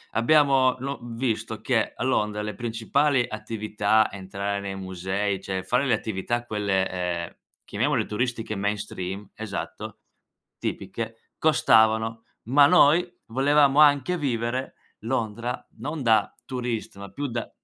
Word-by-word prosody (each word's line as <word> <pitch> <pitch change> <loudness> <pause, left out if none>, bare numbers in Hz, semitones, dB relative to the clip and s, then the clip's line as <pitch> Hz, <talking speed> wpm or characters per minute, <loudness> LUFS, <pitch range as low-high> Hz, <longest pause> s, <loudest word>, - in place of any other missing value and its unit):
abbiamo 135 +1 +4
lo 140 +2 -4
visto 120 -1 -3
che - - 0
a - - -4
Londra 105 0 0
le 105 -1 -4
principali 120 +4 +1
attività, 110 -1 0
entrare 100 +1 -4
nei 100 -1 -5
musei, 95 +1 -2
cioè 95 -1 -3
fare 125 +8 +1
le 130 - +2
attività 115 +3 -2
quelle, 100 -4 0
ehm, 90 -2 -3 0.3
chiamiamole 120 +2 0
turistiche 115 -1 -2
mainstream, 100 -1 -3
esatto, 110 -3 -6 0.6
tipiche, 115 -1 -4 0.2
costavano. 110 -6 +3 0.2
Ma 140 +5 +6
noi 175 0 +5 0.2
volevamo 140 +3 +3
anche 145 +3 +5
vivere 125 -3 -2 0.3
Londra 115 0 -2
non 145 +4 -4
da 110 -3 +3
turista, 120 -5 -4
ma 100 0 -8
più 145 +8 -3
da, 120 -2 -4
115 Hz, 125 wpm, -25 LUFS, 100-130 Hz, 0.6 s, Ma